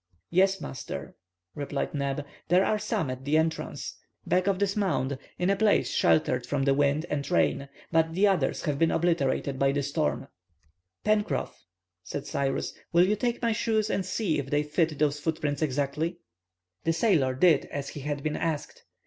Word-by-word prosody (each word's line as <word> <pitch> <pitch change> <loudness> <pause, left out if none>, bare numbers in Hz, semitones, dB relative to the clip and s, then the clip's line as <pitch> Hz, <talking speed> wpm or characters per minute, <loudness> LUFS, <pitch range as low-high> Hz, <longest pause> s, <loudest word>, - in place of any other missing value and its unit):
"Yes, 190 +2 +3
master," 70 - -6 0.4
replied 145 -1 -3
Neb; 140 0 -2 0.2
"there 180 +3 +4
are 215 - +1
some 165 -9 -1
at 130 +1 -6
the 145 +3 +2
entrance, 160 0 -2 0.3
back 185 +1 +1
of 195 -2 +2
this 200 0 0
mound, 140 -10 0 0.2
in 180 +2 +1
a - - +3
place 210 0 +2
sheltered 125 -6 +2
from 145 -1 0
the 135 0 +3
wind 145 +3 +2
and 145 -3 -3
rain, 140 -5 +1 0.2
but 160 0 +2
the 195 +3 +4
others 195 -2 +1
have 145 -4 -1
been 165 - +4
obliterated 145 -5 0
by 135 0 +3
the 140 0 -1
storm." 140 -2 -1 0.8
"Pencroff," 210 - 0 0.4
said 135 - -5
Cyrus, 135 -1 -1 0.2
"will 175 +1 +5
you 210 - +2
take 240 +2 -2
my 230 - +3
shoes 220 -1 +1
and 195 - 0
see 185 -7 -1
if 135 -1 -4
they 145 +1 +2
fit 155 0 0
those 150 -1 +1
footprints 150 -2 -2
exactly?" 150 +4 -1 0.7
The 165 - +2
sailor 160 - +2
did 155 +1 +4
as 140 -1 -5
he - - -7
had 145 0 -3
been 155 -1 -1
asked. 160 -3 -3
155 Hz, 175 wpm, -28 LUFS, 140-185 Hz, 0.8 s, will